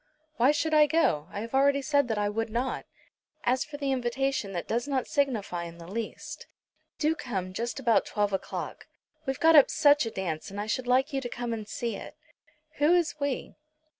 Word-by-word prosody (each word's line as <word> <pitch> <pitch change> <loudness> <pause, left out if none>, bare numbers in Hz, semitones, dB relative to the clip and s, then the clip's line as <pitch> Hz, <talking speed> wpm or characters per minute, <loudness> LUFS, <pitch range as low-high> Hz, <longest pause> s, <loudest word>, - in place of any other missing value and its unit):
"Why 245 +3 +5
should 315 +1 0
I 300 -1 +6
go? 285 - +2
I 205 - -5
have 230 +2 -7
already 280 +1 +3
said 285 -2 +2
that 220 -2 -1
I 205 0 +1
would 225 +2 -2
not." 245 +4 -2 0.6
"As 250 +1 +2
for 295 -1 -8
the 280 -2 -1
invitation 260 -3 -1
that 175 - -4
does 240 +4 -1
not 270 -3 0
signify 215 -11 -1
in 170 0 -9
the 170 - -10
least. 230 - -6 0.5
Do 310 0 +2
come 190 - -4
just 235 +6 -3
about 235 -4 +3
twelve 205 -1 0
o'clock. 195 - -4 0.4
We've 270 -1 -1
got 325 0 +6
up 285 - +8
such 290 -4 +4
a - - -1
dance, 180 -6 -4
and 200 +1 -7
I 205 - -2
should 245 +4 -2
like 265 +4 +2
you 270 - 0
to 245 - -4
come 240 -1 -3
and 215 -2 -5
see 235 +1 -3
it." - - -10 0.6
"Who 295 +3 +4
is 335 -3 0
we?" 280 -3 -2
245 Hz, 205 wpm, -28 LUFS, 210-285 Hz, 0.6 s, up